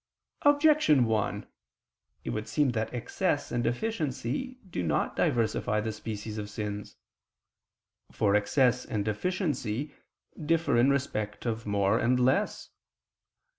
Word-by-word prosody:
Objection 290 - +5
1: 110 -2 -1 0.8
It - - -3
would 110 0 -3
seem 145 -4 +2
that 110 -2 -2
excess 145 +6 -1
and 120 0 0
deficiency 155 - -2
do 170 - -3
not 80 -4 0
diversify 110 -2 +1
the 110 +1 -2
species 110 0 -6
of 105 -1 -5
sins. 105 -1 -5 1.2
For 100 - +1
excess 125 +4 +3
and 105 -5 -3
deficiency 140 - -2 0.5
differ 160 -3 +2
in 120 +3 +5
respect 115 -7 -2
of 115 -1 -2
more 100 +2 +2
and 125 +2 +2
less. 125 +1 +1
120 Hz, 120 wpm, -29 LUFS, 105-145 Hz, 1.2 s, Objection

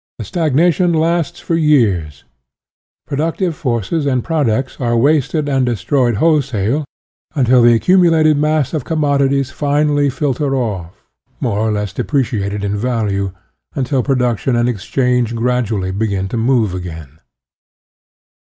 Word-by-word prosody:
The - - -6
stagnation 170 +1 +1
lasts 170 +1 0
for - - -3
years; 110 - +1 0.8
productive 165 +4 -2
forces 130 - -2
and 130 -3 0
products 135 -6 -1
are 120 -1 +1
wasted 145 +3 +1
and 135 -2 +1
destroyed 120 +1 0
wholesale, 140 -2 +1 0.5
until 130 -3 +4
the 120 0 +6
accumulated 165 +1 +4
mass 150 -1 0
of 155 -5 -2
commodities 140 -3 0
finally 145 0 +1
filter 140 +1 -1
off, 100 -9 -4 0.3
more 105 -4 -1
or 110 0 0
less 105 -2 -3
depreciated 105 -7 -2
in 100 0 -1
value, 105 -4 -1 0.4
until 135 0 0
production 125 -2 0
and 120 0 +1
exchange 125 +1 0
gradually 115 -5 -1
begin 100 -1 -2
to - - -4
move 115 -4 +1
again. 80 -5 -8
130 Hz, 125 wpm, -16 LUFS, 110-150 Hz, 0.8 s, the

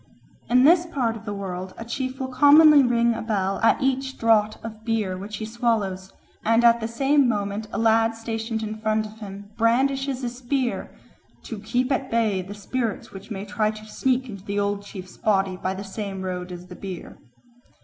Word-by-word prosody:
In 250 +1 +5
this 340 +4 +5
part 250 -9 -1
of 220 -1 -10
the 205 - -3
world 185 -1 -5
a 225 - -7
chief 255 +2 -4
will 260 -1 -3
commonly 290 +3 +7
ring 235 -2 +3
a - - -4
bell 195 -3 -1
at 225 - +4
each 265 0 -1
draught 215 -2 +3
of 220 -1 -8
beer 220 -5 -1
which 205 +3 -6
he 220 - -4
swallows, 215 -5 -1 0.3
and 230 +2 +3
at 235 0 +6
the 225 - -2
same 270 +3 +3
moment 205 0 -2
a - - -3
lad 225 0 +3
stationed 225 0 -3
in 215 0 -5
front 215 0 +1
of 215 +1 -11
him 200 -1 -9
brandishes 265 +3 +1
a 245 - 0
spear 245 +1 -2 0.5
"to 225 - -6
keep 245 +5 -1
at 265 0 0
bay 220 -5 +1
the 195 +3 -8
spirits 225 +2 -3
which 195 +2 -11
might 200 -2 -6
try 215 +1 +1
to 215 0 -7
sneak 260 +3 0
into 200 -5 -9
the 205 0 -2
old 200 0 0
chief's 190 -2 -10
body 195 -3 +1
by 185 +1 -3
the 195 - -6
same 195 -1 -5
road 180 -1 -4
as 175 0 -8
the 180 0 -11
beer." 185 -2 -8
220 Hz, 200 wpm, -24 LUFS, 200-245 Hz, 0.5 s, commonly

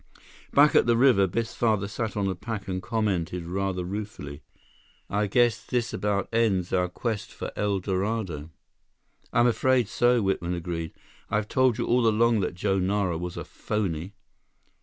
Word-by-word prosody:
Back 145 +1 +6
at - - +4
the 120 -1 +4
river, 120 -7 +5
Biff's 115 +5 -2
father 110 -4 +1
sat 110 +1 -4
on 100 -1 +1
a 95 - 0
pack 100 +2 -6
and 95 -1 -3
commented 90 -6 -1
rather 95 +1 -2
ruefully: 100 -7 -6 0.7
"I 105 +1 +1
guess 120 +2 +2
this 120 -2 -2
about 100 -2 -1
ends 100 -6 +1
our 90 -1 +2
quest 110 +3 -4
for - - -6
El 100 -1 0
Dorado." 95 -5 -2 0.8
"I'm 120 - +4
afraid 125 0 +3
so," 120 +1 +2
Whitman 90 -2 -1
agreed. 85 -2 -4 0.4
"I've 105 0 0
told 130 -2 +2
you - - -1
all 120 -1 +3
along 115 +1 +3
that 90 -2 -2
Joe 95 +1 0
Nara 95 -1 0
was 90 0 -5
a - - -4
phony." 95 -2 -3
100 Hz, 160 wpm, -26 LUFS, 90-115 Hz, 0.8 s, Back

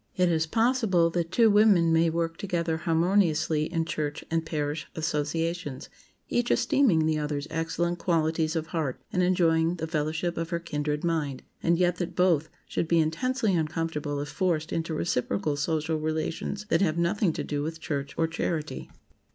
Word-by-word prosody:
It 180 -1 +3
is 160 -1 +1
possible 225 -6 +2
that 170 0 -2
two 225 +1 +5
women 200 -6 +5
may 165 +1 +4
work 165 0 -2
together 170 -4 -1
harmoniously 165 -2 +2
in 165 -2 0
church 150 -2 -3
and 165 0 +1
parish 150 -1 -3
associations, 160 0 -2 0.4
each 240 0 0
esteeming 195 - +3
the 155 -1 +1
other's 150 -1 -2
excellent 170 +2 -1
qualities 160 -1 +1
of 160 -1 -1
heart 155 -5 -3
and 180 - +2
enjoying 170 -2 +3
the 160 - -4
fellowship 160 +2 -2
of 165 0 -2
her 170 -1 -1
"kindred 150 -2 -3
mind," 155 -6 -1 0.2
and 170 0 +2
yet 180 0 +2
that 175 -1 -4
both 170 -4 +2 0.2
should 165 - -2
be 170 - +3
intensely 210 +8 +1
uncomfortable 155 -3 -1
if 145 +1 -4
forced 160 -4 -1
into 165 -1 -2
reciprocal 145 -2 -1
social 160 +2 -1
relations 160 +6 -3
that - - +3
have 165 -4 +1
nothing 175 +2 +2
to - - -3
do 145 -1 -2
with 160 +2 -4
church 140 -3 -4
or 165 - +2
charity. 160 -1 -3
165 Hz, 165 wpm, -27 LUFS, 155-175 Hz, 0.4 s, two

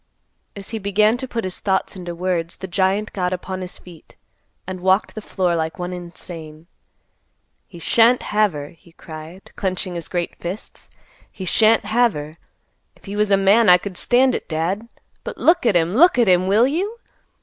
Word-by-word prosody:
As 200 -1 -8
he 225 - -4
began 210 +2 +2
to 260 +1 -5
put 235 -2 -3
his 185 -1 -5
thoughts 190 -1 -1
into 175 -2 -6
words, 170 -1 -2
the 190 - -7
giant 190 +3 0
got 180 -2 -1
upon 185 +1 -5
his 180 0 -7
feet, 175 -3 -15 0.5
and 185 0 -6
walked 190 +3 +2
the 215 - -7
floor 180 -4 -1
like 160 0 -2
one 180 0 -4
insane. 165 -3 -9 1.0
"He 175 - -13
shan't 230 +8 +4
have 210 -3 +1
her," 145 -1 -6
he 170 -1 -21
cried, 160 +3 -11
clenching 185 -2 -2
his 170 -1 -5
great 175 -2 -3
fists; 180 +4 -8 0.4
"he 190 - -7
shan't 220 +3 +3
have 235 +2 +2
her. 150 +2 -8 0.6
If - - -22
he 200 0 -6
was 210 0 +1
a 195 - +5
man 200 +2 +4
I 180 - +9
could 185 +1 -7
stand 255 +6 +3
it, - - -5
Dad. 175 +8 -2 0.4
But - - -6
look 335 -5 +3
at 210 - +3
him! 170 +1 +2
Look 325 +6 +5
at 240 -3 +4
him, 185 0 +4
will 210 +5 +4
you? 375 - -2
190 Hz, 190 wpm, -21 LUFS, 175-215 Hz, 1.0 s, I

